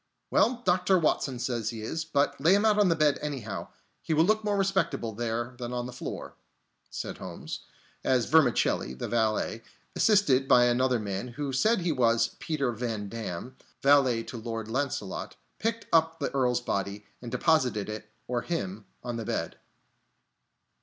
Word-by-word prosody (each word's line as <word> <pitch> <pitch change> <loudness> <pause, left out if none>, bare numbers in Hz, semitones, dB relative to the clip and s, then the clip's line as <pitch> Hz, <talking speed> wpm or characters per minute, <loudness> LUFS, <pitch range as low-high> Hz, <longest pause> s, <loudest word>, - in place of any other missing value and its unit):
"Well, 245 0 +3
Dr. 185 +1 +3
Watson 145 -5 +1
says 120 -3 -2
he 115 -2 -6
is. 160 +8 -3
But 145 -3 0
lay 175 +5 +6
him 205 +2 +2
out 210 -1 +4
on 205 -3 +5
the 165 - +3
bed, 150 -2 +3
anyhow, 130 -9 -4 0.3
he 160 - -1
will 160 - +5
look 215 +4 +2
more 205 -1 0
respectable 190 - 0
there 120 +2 -2
than 120 0 -4
on 120 0 -2
the 125 - -7
floor," 125 - -6 0.6
said - - -5
Holmes, - - -6 0.4
as 125 -3 +2
Vermicelli, 125 - +3
the - - -4
valet, 110 -1 0 0.3
assisted 145 -12 +4
by 125 - +6
another 125 +1 +2
man, 100 +1 -3
who 135 +3 -4
said 215 - +3
he 170 -1 +1
was 115 -4 +3
Peter 140 -6 -1
Van 110 -3 -3
Damm, 115 +2 -6 0.3
valet 135 -5 +4
to 120 - -7
Lord 115 -1 -4
Launcelot, 120 -5 -3 0.2
picked 230 +2 -1
up 165 0 +4
the 145 - -2
Earl's 125 -3 +2
body 100 -2 -3 0.2
and 120 - -6
deposited 125 - +2
it, 105 0 -6 0.2
or 120 -1 -1
him, 105 - -4 0.2
on 120 -1 -3
the 115 - -4
bed. - - -3
125 Hz, 165 wpm, -28 LUFS, 115-160 Hz, 0.6 s, lay